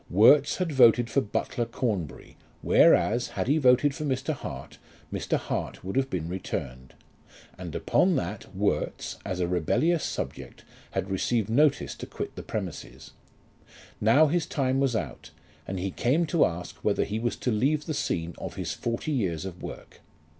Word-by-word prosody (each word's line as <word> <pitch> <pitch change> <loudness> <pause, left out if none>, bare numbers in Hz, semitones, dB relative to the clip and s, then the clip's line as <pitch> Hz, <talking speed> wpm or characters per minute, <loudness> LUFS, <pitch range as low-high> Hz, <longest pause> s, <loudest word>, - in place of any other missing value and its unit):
Worts 140 +10 +6
had 180 -3 -2
voted 120 -3 +5
for - - +3
Butler 115 +3 -2
Cornbury, 105 - -3 0.3
whereas, 120 +4 +4
had - - -3
he 150 +4 +3
voted 130 +1 +4
for 155 - -5
Mr. 135 +1 -1
Hart, 140 - -8 0.3
Mr. - - 0
Hart - - -4
would 95 +1 -5
have 135 0 +1
been 85 -3 -3
returned; 65 -8 -5 0.6
and, - - -7
upon 185 -1 +2
that, 100 -2 -4
Worts, 100 +2 -1
as 90 - -4
a 90 - +1
rebellious 125 - +1
subject, - - -5 0.3
had 95 0 -2
received 110 +2 0
notice 145 +4 +3
to - - -8
quit - - -6
the - - -6
premises. 65 +3 -6 0.9
Now 125 +9 +6
his 160 +1 0
time 135 -1 0
was 135 -3 +1
out, 75 - -4 0.4
and 95 -1 -3
he 95 +1 -2
came 145 - +1
to 170 - +5
ask 90 +1 -5
whether - - +1
he 105 +2 -3
was 120 +1 -1
to 125 - -2
leave 140 +7 +1
the 155 - -3
scene 85 - -2
of - - -6
his - - -3
forty 120 +6 -3
years 95 - -1
of 90 -2 -8
work. - - -9
120 Hz, 170 wpm, -27 LUFS, 95-140 Hz, 0.9 s, Worts